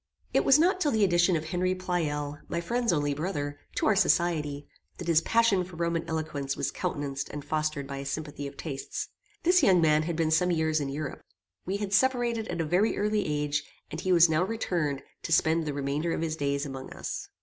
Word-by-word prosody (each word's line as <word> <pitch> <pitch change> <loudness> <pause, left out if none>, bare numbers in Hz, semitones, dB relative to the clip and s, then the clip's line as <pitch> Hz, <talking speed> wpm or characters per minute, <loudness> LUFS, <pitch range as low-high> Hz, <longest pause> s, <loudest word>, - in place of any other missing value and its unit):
It - - +3
was 275 - +6
not 365 +4 +3
till 300 - +3
the 220 -5 +2
addition 175 -1 +4
of 155 0 -2
Henry 180 +3 0
Pleyel, 150 -5 -2
my 170 - -2
friend's 235 +7 0
only 145 -3 +1
brother, 145 -2 -3 0.2
to - - 0
our 215 - +4
society, 155 -7 +1 0.3
that 175 - -7
his 165 -1 +4
passion 225 -2 +3
for 180 -1 -11
Roman 170 0 -1
eloquence 150 -4 -3
was - - -1
countenanced 140 -1 -3
and 145 -1 -7
fostered 155 -2 -1
by 140 0 -6
a 140 - -5
sympathy 145 -1 -4
of 140 0 -11
tastes. 140 -4 -5 0.3
This 360 +2 +5
young 185 -2 +5
man 155 -2 +4
had 165 +1 -2
been 160 -1 +1
some 180 +3 +3
years 160 -2 +1
in 140 -2 -2
Europe. 140 0 -5 0.5
We 195 +2 0
had 200 -1 -4
separated 240 -1 +2
at 170 - -2
a - - -1
very 185 +8 +2
early 210 -1 0
age, 150 0 -1 0.3
and 155 +3 -4
he 185 - 0
was 175 -1 +7
now 160 +2 +2
returned 175 -9 -1 0.2
to - - -6
spend 160 0 +3
the 145 - -1
remainder 145 +4 -1
of - - -2
his 160 -1 -1
days 140 -1 -1
among 135 -1 -7
us. - - -5
160 Hz, 215 wpm, -28 LUFS, 145-185 Hz, 0.5 s, was